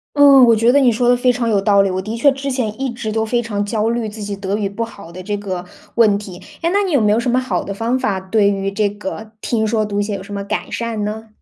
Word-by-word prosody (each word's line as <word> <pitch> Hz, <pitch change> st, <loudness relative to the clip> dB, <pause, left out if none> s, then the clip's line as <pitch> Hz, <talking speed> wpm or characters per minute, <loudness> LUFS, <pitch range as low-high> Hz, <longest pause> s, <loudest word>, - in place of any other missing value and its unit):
嗯， 280 Hz, -2 st, +7 dB
我 230 Hz, -2 st, +5 dB
觉 230 Hz, +3 st, +3 dB
得 285 Hz, -, +5 dB
你 255 Hz, -3 st, +5 dB
说 240 Hz, +2 st, +1 dB
得 245 Hz, -, +5 dB
非 250 Hz, 0 st, +2 dB
常 240 Hz, -1 st, -2 dB
有 210 Hz, -3 st, +2 dB
道 200 Hz, 0 st, +4 dB
理。 195 Hz, -, +1 dB
我 185 Hz, 0 st, -2 dB
的 215 Hz, +4 st, -5 dB
确 280 Hz, +4 st, +4 dB
之 275 Hz, +1 st, -4 dB
前 250 Hz, -3 st, -3 dB
一 270 Hz, -1 st, -1 dB
直 235 Hz, -2 st, -5 dB
都 220 Hz, 0 st, 0 dB
非 240 Hz, +2 st, 0 dB
常 210 Hz, -3 st, -2 dB
焦 215 Hz, +1 st, -1 dB
虑 235 Hz, -1 st, -2 dB
自 215 Hz, +1 st, -9 dB
己 205 Hz, 0 st, -4 dB
德 200 Hz, 0 st, -3 dB
语 205 Hz, -2 st, -1 dB
不 200 Hz, +4 st, -3 dB
好 170 Hz, -7 st, -12 dB
的 185 Hz, +2 st, -8 dB
这 205 Hz, +2 st, -3 dB
个 190 Hz, -3 st, -5 dB, 0.3 s
问 215 Hz, -4 st, +4 dB
题。 195 Hz, -4 st, -9 dB, 0.2 s
诶， 335 Hz, -, +1 dB
那 400 Hz, +3 st, +2 dB
你 385 Hz, -, -2 dB
有 285 Hz, -6 st, +3 dB
没 210 Hz, -1 st, +3 dB
有 220 Hz, -, +2 dB
什 240 Hz, -, -3 dB
么 250 Hz, -, +2 dB
好 255 Hz, 0 st, -1 dB
的 200 Hz, -, -5 dB
方 230 Hz, +5 st, -1 dB
法， 215 Hz, -7 st, -1 dB
对 200 Hz, +2 st, +2 dB
于 195 Hz, 0 st, -2 dB
这 205 Hz, +1 st, +1 dB
个 205 Hz, +2 st, -7 dB
听 220 Hz, -1 st, -1 dB
说 215 Hz, 0 st, 0 dB
读 205 Hz, 0 st, -1 dB
写 205 Hz, 0 st, -3 dB
有 190 Hz, -, -8 dB
什 205 Hz, +1 st, -9 dB
么 200 Hz, -, -3 dB
改 200 Hz, -, -3 dB
善 230 Hz, -3 st, -3 dB
呢？ 220 Hz, +2 st, -5 dB
220 Hz, 320 characters per minute, -18 LUFS, 200-240 Hz, 0.3 s, 嗯